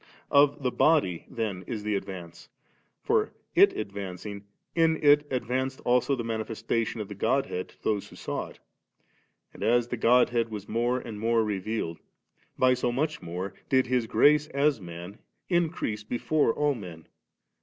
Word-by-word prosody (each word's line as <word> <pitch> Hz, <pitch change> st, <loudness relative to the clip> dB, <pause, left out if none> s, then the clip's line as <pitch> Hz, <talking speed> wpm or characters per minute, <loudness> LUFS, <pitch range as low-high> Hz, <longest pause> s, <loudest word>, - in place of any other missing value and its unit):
Of 140 Hz, 0 st, +4 dB
the 125 Hz, -, +1 dB
body 140 Hz, -, +2 dB
then 105 Hz, -6 st, -3 dB
is 105 Hz, -2 st, -4 dB
the 105 Hz, 0 st, -1 dB
advance; 90 Hz, -4 st, -6 dB, 0.5 s
for, -, -, +1 dB, 0.2 s
it -, -, +6 dB
advancing, 100 Hz, 0 st, -6 dB, 0.3 s
in 165 Hz, -1 st, +3 dB
it 145 Hz, 0 st, +5 dB
advanced 130 Hz, +1 st, -2 dB
also 125 Hz, +3 st, +3 dB
the 120 Hz, -, -4 dB
manifestation 115 Hz, 0 st, -2 dB
7 110 Hz, -, -5 dB
of 105 Hz, -, -5 dB
the 105 Hz, -, -7 dB
Godhead 110 Hz, -3 st, -1 dB
to -, -, -23 dB
those 105 Hz, -2 st, 0 dB
who -, -, -14 dB
saw -, -, -4 dB
it. -, -, -15 dB, 1.0 s
And, -, -, -13 dB
as 120 Hz, +1 st, +2 dB
the 125 Hz, -, -2 dB
Godhead 120 Hz, 0 st, +3 dB
was 105 Hz, -2 st, -7 dB
more 120 Hz, +3 st, 0 dB
and 115 Hz, -4 st, -7 dB
more 115 Hz, +1 st, +2 dB
revealed, 100 Hz, -4 st, -3 dB, 0.6 s
by 130 Hz, 0 st, +5 dB
so 125 Hz, -1 st, 0 dB
much 150 Hz, +5 st, -1 dB
more 90 Hz, +3 st, -5 dB, 0.2 s
did 130 Hz, -1 st, +4 dB
His 125 Hz, -2 st, 0 dB
grace 150 Hz, +7 st, +4 dB
as 140 Hz, -4 st, +1 dB
man 85 Hz, +3 st, -9 dB, 0.3 s
increase 165 Hz, -, 0 dB
before 125 Hz, +5 st, +1 dB
all 145 Hz, +4 st, +1 dB
men. 90 Hz, -9 st, -9 dB
115 Hz, 160 wpm, -28 LUFS, 100-130 Hz, 1.0 s, it